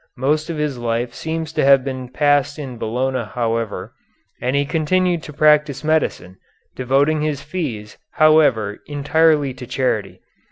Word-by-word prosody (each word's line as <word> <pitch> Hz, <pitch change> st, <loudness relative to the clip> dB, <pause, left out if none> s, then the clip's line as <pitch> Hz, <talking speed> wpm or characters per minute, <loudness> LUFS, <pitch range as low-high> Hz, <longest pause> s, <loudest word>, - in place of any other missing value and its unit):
Most 150 Hz, +5 st, 0 dB
of 165 Hz, -, -3 dB
his 150 Hz, -4 st, -2 dB
life 120 Hz, +1 st, -2 dB
seems 160 Hz, 0 st, -4 dB
to -, -, 0 dB
have 135 Hz, -1 st, +5 dB
been 130 Hz, -2 st, -5 dB
passed 145 Hz, +1 st, +1 dB
in 130 Hz, -5 st, -7 dB
Bologna 125 Hz, +3 st, -1 dB
however, 115 Hz, -2 st, -2 dB, 0.5 s
and 125 Hz, +2 st, -1 dB
he 140 Hz, 0 st, +2 dB
continued 170 Hz, +3 st, 0 dB
to 150 Hz, -, -9 dB
practise 150 Hz, -1 st, +3 dB
medicine, 150 Hz, -, -1 dB, 0.4 s
devoting 140 Hz, +4 st, +1 dB
his 150 Hz, -2 st, -2 dB
fees, 140 Hz, -, -5 dB
however, 150 Hz, -10 st, +3 dB
entirely 145 Hz, -1 st, +2 dB
to 125 Hz, -1 st, -10 dB
charity. 115 Hz, -7 st, -2 dB
140 Hz, 145 wpm, -20 LUFS, 125-155 Hz, 0.5 s, have